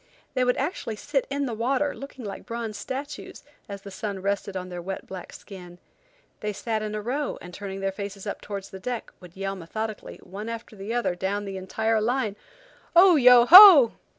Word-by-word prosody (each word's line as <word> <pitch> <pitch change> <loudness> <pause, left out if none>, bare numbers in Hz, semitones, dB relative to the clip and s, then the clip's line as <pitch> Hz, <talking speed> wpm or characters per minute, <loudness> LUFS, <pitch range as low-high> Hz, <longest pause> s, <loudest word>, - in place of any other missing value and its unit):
They 255 -2 +1
would 250 0 +1
actually 275 - -3
sit 275 +5 -2
in 280 0 -2
the 245 - -4
water 270 +6 0
looking 275 -3 -10
like 200 - -8
bronze 230 -2 -5
statues, 270 +7 -7 0.3
as 200 -1 -8
the 200 - -9
sun 200 0 -5
rested 200 0 -3
on 185 0 -6
their 175 -1 -6
wet, 190 +2 -6
black 185 -2 -9
skins. 180 -3 -12 0.6
They 210 0 -3
sat 220 +1 -3
in 215 0 -4
a 210 - -3
row, 275 +5 -3
and 180 - -12
turning 195 0 -7
their 195 0 -1
faces 200 0 -7
up 205 - -5
towards 200 -2 -7
the 190 - -9
deck, 245 +3 -5
would 180 -1 -15
yell 195 0 -3
methodically, 215 +4 -6
one 205 +4 -8
after 230 -1 -8
the 200 +2 -7
other, 240 -6 0
down 195 +3 -3
the 195 -1 -6
entire 220 +4 -1
line: 230 -2 -1 0.6
"Oh! 360 0 +7
Yo! 250 -3 +7
Ho!" 355 - +10
215 Hz, 200 wpm, -25 LUFS, 195-250 Hz, 0.6 s, Ho